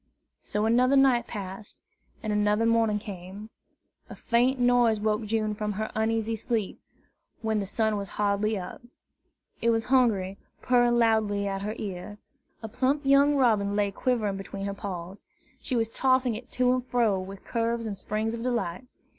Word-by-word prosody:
So 210 +1 -2
another 250 +4 +3
night 265 -3 +4
passed, 200 0 -8 0.4
and 215 -1 -1
another 210 +2 +2
morning 230 -2 +2
came. 200 +1 -9 0.6
A - - -8
faint 250 +3 +1
noise 245 -3 +3
woke 215 +1 0
June 215 0 0
from 210 0 -3
her 215 +2 -4
uneasy 225 0 0
sleep, 225 -2 -3 0.6
when 220 -1 0
the 200 - -3
sun 220 +1 0
was 200 -1 -4
hardly 210 +1 +1
up. 180 -2 -7 0.8
It 235 - +2
was 225 -1 +2
Hungry, 200 -7 +2 0.2
purring 240 -1 +3
loudly 215 -3 +2
at 195 0 -3
her 210 +2 -3
ear. 200 +1 -6 0.5
A - - -3
plump 270 +6 0
young 280 +1 +5
robin 215 -7 +2
lay 205 -1 +1
quivering 215 -3 -1
between 195 0 -6
her 200 - -2
paws. 190 -1 -7 0.3
She 260 - -3
was 225 -1 0
tossing 255 -1 +2
it 230 +3 -8
to 250 0 +3
and 255 -1 -1
fro 230 -6 +2
with 190 +1 -9
curves 230 0 -1
and 210 -2 -3
springs 215 +3 -3
of 230 - -5
delight. 240 -3 -2
220 Hz, 165 wpm, -27 LUFS, 205-240 Hz, 0.8 s, young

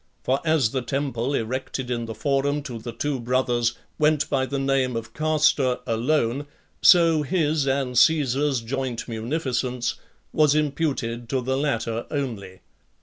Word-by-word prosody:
For 135 +2 +1
as 155 -8 +2
the 130 - -1
temple 135 0 -2
erected 130 +2 -3
in 120 -1 -2
the 115 -1 -6
Forum 145 +1 0
to 125 -5 -6
the 120 +2 -6
two 135 +4 -2
brothers, 120 -1 0 0.2
went 155 0 +3
by 130 -2 +1
the 140 - -3
name 135 -2 +1
of 115 -1 -5
Castor 150 -4 +2
alone, 120 +3 0 0.3
so 165 -3 +6
his 150 -2 0
and 135 -2 0
Caesar's 140 -2 +3
joint 125 0 -3
munificence 125 +1 -2 0.4
was 150 -1 +4
imputed 135 -6 -1
to 135 - 0
the 130 +2 -1
latter 120 -5 -1
only. 115 -10 -4
135 Hz, 145 wpm, -24 LUFS, 120-145 Hz, 0.4 s, so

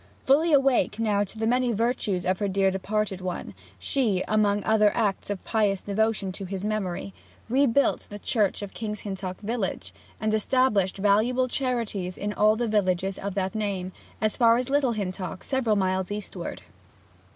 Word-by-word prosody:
Fully 310 +5 +4
awake 270 -6 +3
now 210 -3 +1
to 205 +2 -10
the 220 - -1
many 250 +1 +2
virtues 210 -5 0
of 185 0 +1
her 205 - 0
dear 195 0 +2
departed 195 0 -2
one, 180 - -4 0.2
she, 195 - 0
among 205 -1 +2
other 215 -1 +4
acts 205 -4 0
of 200 -2 -4
pious 205 -4 +1
devotion 210 -1 0
to 195 +1 -7
his 190 0 -5
memory, 185 - -2 0.3
rebuilt 270 +2 +2
the 205 - -7
church 205 -1 0
of 200 - -7
King's 210 -2 -5
Hintock 190 -2 -5
village, 200 - -3 0.3
and 215 0 0
established 215 -4 +2
valuable 215 +6 +2
charities 230 -9 -2
in 205 +1 -3
all 215 +1 +4
the 240 +1 -1
villages 190 -2 0
of 200 -1 -4
that 190 0 -1
name, 200 -4 -2 0.3
as 215 -1 +1
far 230 -1 +5
as 250 - -1
to 270 - -6
Little 275 -4 +3
Hintock, 185 -2 -4
several 255 -6 +1
miles 190 -1 0
eastward. 210 0 -6
210 Hz, 170 wpm, -26 LUFS, 190-230 Hz, 0.3 s, far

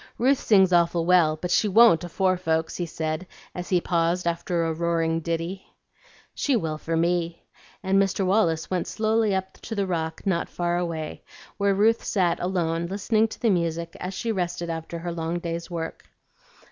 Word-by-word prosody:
"Ruth 265 +3 +3
sings 190 -4 +4
awful 170 -1 +3
well, 170 -3 +4
but 180 +1 -3
she 215 - +3
won't 210 -4 +6
afore 185 +2 +1
folks," 160 -3 -1
he 175 - -2
said, 160 +2 -3 0.3
as 180 0 -6
he 180 - +3
paused 170 +1 0
after 170 0 -1
a 165 - 0
roaring 165 0 0
ditty. 170 +3 -3 0.7
"She 280 - +1
will 160 -8 -2
for 165 +1 -2
me;" 170 0 0 0.4
and 195 +1 +3
Mr. 195 0 0
Wallace 180 -5 +1
went 180 -2 -1
slowly 220 -2 +1
up 190 0 -5
to 225 - -6
the 200 -1 0
rock 160 -3 -3
not 185 -4 0
far 175 0 -1
away, 165 -3 -4 0.4
where 200 -1 +2
Ruth 225 +3 +3
sat 180 -4 +1
alone 170 -2 -1
listening 215 +4 +1
to - - -10
the 230 - +2
music 170 -2 -1
as 185 +1 -5
she 230 +3 -2
rested 175 -3 -2
after 165 +1 -5
her 170 +1 -4
long 165 0 -2
day's 170 0 -4
work. 165 -2 -5
175 Hz, 180 wpm, -25 LUFS, 165-190 Hz, 0.7 s, won't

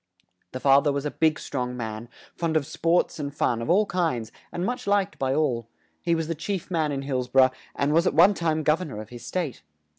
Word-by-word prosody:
The 130 - -4
fa 135 +1 +5
ther 145 - +2
was 140 +1 -2
a 150 - -1
big 160 -1 +1
strong 125 -2 -3
man, 110 0 -5 0.2
fond 165 -2 0
of 145 - -1
sports 165 +3 +1
and 140 -1 -3
fun 125 -5 0
of 115 - -4
all 200 +5 +4
kinds 155 - -1 0.2
and 175 - -2
much 245 0 -3
liked 200 -1 +1
by 135 -1 0
all; 125 -8 0 0.3
he 170 -1 +1
was 165 -1 -2
the 165 - -1
chief 185 +4 -4
man 160 -3 +1
in 135 -1 -3
Hills 130 -2 -2
bor 130 +1 +6
ough, 130 - +3 0.2
and 145 +1 +1
was 170 +3 +4
at - - 0
one 180 +6 +7
time 160 -4 0
gov 155 +4 +3
ern 180 - -5
or 105 - -6
of 110 - -8
his 120 -1 -10
state. 155 - -3
150 Hz, 245 wpm, -25 LUFS, 130-170 Hz, 0.3 s, one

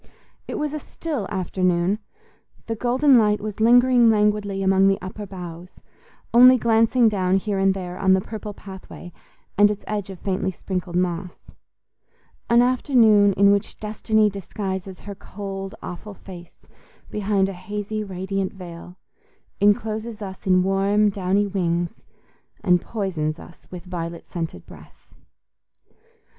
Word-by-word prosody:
It - - -5
was 300 -1 -2
a 305 - -3
still 290 - -5
afternoon—the 190 - -3
golden 255 +3 +4
light 210 -1 +2
was 215 0 -6
lingering 245 +1 +5
languidly 210 -2 +1
among 195 0 +4
the 195 0 +2
upper 200 +2 -7
boughs, 180 -2 -9 0.6
only 250 +2 +8
glancing 230 +1 +3
down 190 -3 +1
here 200 0 -2
and 195 0 +3
there 180 -1 -6
on 190 -1 +4
the 190 - +4
purple 215 +1 -7
pathway 190 -3 -11 0.5
and 205 0 +7
its 210 -1 -4
edge 205 -2 -3
of 190 - -8
faintly 190 0 -2
sprinkled 180 -1 -5
moss: 180 0 -3 1.0
an 235 +1 +5
afternoon 230 -6 +4
in 200 +1 +5
which 200 -1 -1
destiny 215 0 +1
disguises 190 -1 -5
her 205 - -7
cold 195 0 -7
awful 200 +3 -8
face 175 -3 -13 0.5
behind 200 -2 +1
a 195 - -5
hazy 205 +3 -5
radiant 190 +1 -3
veil, 180 -1 -10 0.6
encloses 215 +2 0
us 190 -2 -8
in 185 -1 +4
warm 200 +2 +2
downy 195 +1 0
wings, 175 -1 -2 0.6
and 180 -1 +3
poisons 170 -8 -3
us 170 - -15
with 180 0 -9
violet 170 -2 -6
scented 165 - -5
breath. - - -17
195 Hz, 135 wpm, -23 LUFS, 185-215 Hz, 1.0 s, only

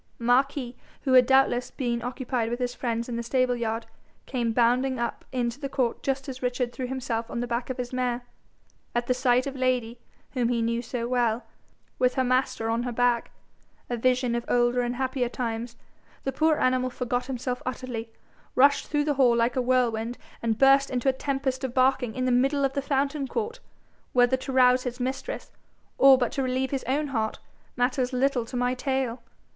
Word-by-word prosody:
Marquis, 250 +1 +1 0.3
who 265 - +1
had 250 -1 +7
doubtless 265 -2 +3
been 240 -3 -2
occupied 245 -1 -2
with 240 - -2
his 245 -1 -2
friends 235 -2 -2
in 240 -2 -3
the - - -2
stable 250 +1 +1
yard, 225 -1 -2 0.4
came 240 -3 -1
bounding 250 +3 +2
up 235 0 -3
into 245 0 -2
the 275 -2 -4
court 255 -4 -1
just 270 0 -2
as 260 -1 -6
Richard 250 -1 -1
threw 255 -2 -4
himself 245 -3 -3
on - - -3
the 245 - -1
back 240 +1 -3
of 260 - -3
his 250 0 -5
mare. 250 -1 -1 0.7
At 240 0 +1
the 255 - +2
sight 250 0 +2
of 275 -1 -4
Lady, 250 -3 0 0.3
whom 245 -3 0
he 240 -1 +1
knew 230 +1 0
so 240 0 -4
well, 240 -2 +1 0.6
with 250 0 +2
her 260 - +2
master 255 -3 0
on 230 +1 0
her 245 0 -3
back, 240 0 +1 0.6
a - - +1
vision 250 +1 +1
of 235 0 -1
older 245 0 +2
and 240 0 -2
happier 260 -1 -1
times, 235 -1 -4 0.5
the 270 - -1
poor 310 +3 +2
animal 255 0 +2
forgot 250 0 -2
himself 250 -1 -3
utterly, 245 -3 -5 0.5
rushed 280 +2 +4
through 295 -1 +1
the 295 0 +1
hall 245 -2 +5
like 235 +1 +1
a 255 - +2
whirlwind, 245 -2 +1 0.2
and 225 -2 0
burst 275 +1 +5
into 255 +1 +1
a - - +2
tempest 265 -1 -2
of 260 -1 -3
barking 255 -3 +2
in 255 - -1
the 255 - +2
middle 275 +3 +3
of 270 - -1
the 280 - -1
fountain 275 +1 0
court 465 - -3 0.5
whether 245 +1 +4
to 260 +1 -6
rouse 255 -1 +5
his 250 0 -5
mistress, 260 - -4 0.5
or 270 -1 +8
but 245 -2 0
to 275 - -2
relieve 260 0 -1
his 270 -2 -2
own 285 +4 0
heart, 220 -4 -1 0.4
matters 250 +1 +1
little 255 -2 +1
to 250 - -5
my 245 0 +1
tale. 260 -2 -2
250 Hz, 195 wpm, -26 LUFS, 240-265 Hz, 0.7 s, or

